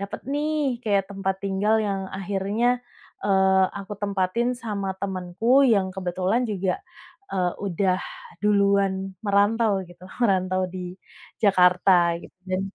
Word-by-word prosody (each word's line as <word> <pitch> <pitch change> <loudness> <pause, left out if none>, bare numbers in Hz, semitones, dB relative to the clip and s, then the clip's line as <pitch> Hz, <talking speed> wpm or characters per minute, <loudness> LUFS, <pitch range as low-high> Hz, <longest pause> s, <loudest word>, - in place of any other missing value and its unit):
dapet 200 0 -5
nih 295 -4 0
kayak 200 -4 +1
tempat 195 -1 -2
tinggal 200 +3 +1
yang 195 -1 -1 0.2
akhirnya, 200 +4 -1 0.6
eee, 190 -1 +4 0.2
aku 200 +1 -8
tempatin 200 +4 0
sama 200 -3 -3
temenku 195 +7 +1
yang 200 -6 +3
kebetulan 185 +4 0
juga, 190 -2 0 0.6
eee, 180 -2 0
udah 185 0 +1 0.4
duluan 200 -1 +3 0.3
merantau 205 0 +2
gitu 175 0 -17 0.2
merantau 185 -2 +1
di 180 -1 -6 0.5
Jakarta 185 -2 +5 0.3
gitu - - -13 0.2
dan 185 0 0
195 Hz, 120 wpm, -24 LUFS, 185-210 Hz, 0.6 s, Jakarta